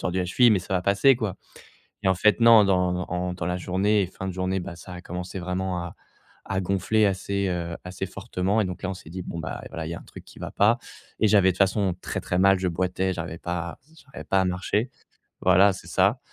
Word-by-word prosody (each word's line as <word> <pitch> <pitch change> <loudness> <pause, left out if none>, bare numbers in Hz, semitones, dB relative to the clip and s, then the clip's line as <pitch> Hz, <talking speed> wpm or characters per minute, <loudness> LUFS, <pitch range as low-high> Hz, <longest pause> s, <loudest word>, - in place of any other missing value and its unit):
tordu 90 +1 -1
la 90 - 0
cheville, 120 +6 +5
mais 105 - +4
ça 95 +1 -4
va 90 - +1
passer 100 +7 +4
quoi, 110 -6 -3 0.7
et - - +2
en 95 - +3
fait 105 +5 +3
non, 115 -2 +8
dans 90 -1 +1
en 90 0 -2
dans 90 -2 -5
la 90 0 -1
journée 95 +3 +1
et - - -3
fin 95 +1 -7
de 95 - -5
journée, 95 +1 -1
bah, 90 0 -7
ça 90 - -10
a 90 - -8
commencé 90 +2 -6
vraiment 90 0 -2
à 85 - -8 0.5
à 95 -1 -1
gonfler 100 +3 +1
assez 100 +1 -1
heu, 85 -1 -3
assez 90 +1 -5
fortement, 100 +1 -1
et 105 - 0
donc 90 -1 -6
là 95 - -1
on - - -2
s'est 80 - -13
dit 90 +2 -6
bon 85 - -6
ben 80 - -5
voilà, 80 -1 -5
il - - -5
y - - -3
a - - -8
un - - -14
truc - - -12
qui - - -15
va - - -6
pas, 110 +4 +3 0.4
et 110 - +4
j'avais 100 -2 +5
de - - -7
toute - - -14
façon 95 -1 +2
très, - - -4
très 90 - -1
mal, 95 0 +5
je 95 - 0
boitais, 90 +2 -1
j'arrivais 85 -1 -5
pas 85 -1 -3
à - - -14 0.2
j'arrivais 140 -3 -11
pas 95 - +2
à - - +1
marcher 95 +6 -1 0.5
voilà, 95 +2 +5
c'est 95 - -10
ça, - - +2
95 Hz, 255 wpm, -25 LUFS, 90-100 Hz, 0.7 s, non